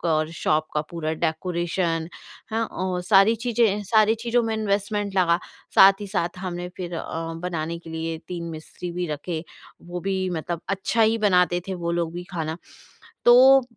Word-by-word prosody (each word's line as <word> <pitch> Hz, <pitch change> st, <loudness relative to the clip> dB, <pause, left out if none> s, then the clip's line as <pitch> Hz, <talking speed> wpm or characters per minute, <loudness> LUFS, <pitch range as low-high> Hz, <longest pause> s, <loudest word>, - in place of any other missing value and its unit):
और 155 Hz, -2 st, +1 dB
शॉप 155 Hz, -1 st, 0 dB
का 150 Hz, -, +2 dB
पूरा 160 Hz, -2 st, -3 dB
डेकोरेशन 170 Hz, 0 st, -1 dB, 0.4 s
हाँ, 225 Hz, +1 st, 0 dB
औ 185 Hz, -1 st, -2 dB
सारी 195 Hz, +3 st, +5 dB
चीज़ें 225 Hz, -4 st, +2 dB
सारी 215 Hz, +2 st, +4 dB
चीज़ों 235 Hz, +1 st, 0 dB
में 225 Hz, -1 st, -1 dB
इन्वेस्टमेंट 205 Hz, -1 st, -1 dB
लगा। 170 Hz, -2 st, +4 dB, 0.4 s
साथ 195 Hz, +1 st, +9 dB
ही 205 Hz, -, -5 dB
साथ 180 Hz, -3 st, -2 dB
हमने 180 Hz, -1 st, -4 dB
फिर 175 Hz, -2 st, -5 dB
अ, 165 Hz, -, -3 dB, 0.4 s
बनाने 170 Hz, -2 st, -3 dB
के 165 Hz, -1 st, -12 dB
लिए 160 Hz, 0 st, -3 dB
3 175 Hz, -2 st, -4 dB
मिस्त्री 160 Hz, +2 st, -7 dB
भी 175 Hz, 0 st, -2 dB
रखे, 155 Hz, +2 st, -4 dB, 0.4 s
वो 175 Hz, +1 st, -6 dB
भी 190 Hz, 0 st, -1 dB
मतलब 170 Hz, 0 st, -3 dB
अच्छा 200 Hz, +4 st, +1 dB
ही 225 Hz, +1 st, +3 dB
बनाते 180 Hz, -2 st, +3 dB
थे 190 Hz, -, -2 dB
वो 170 Hz, -1 st, -3 dB
लोग 170 Hz, -1 st, -1 dB
भी 175 Hz, 0 st, -5 dB
खाना। 160 Hz, -3 st, -3 dB, 0.7 s
तो 260 Hz, +3 st, +8 dB
180 Hz, 170 wpm, -24 LUFS, 170-205 Hz, 0.7 s, साथ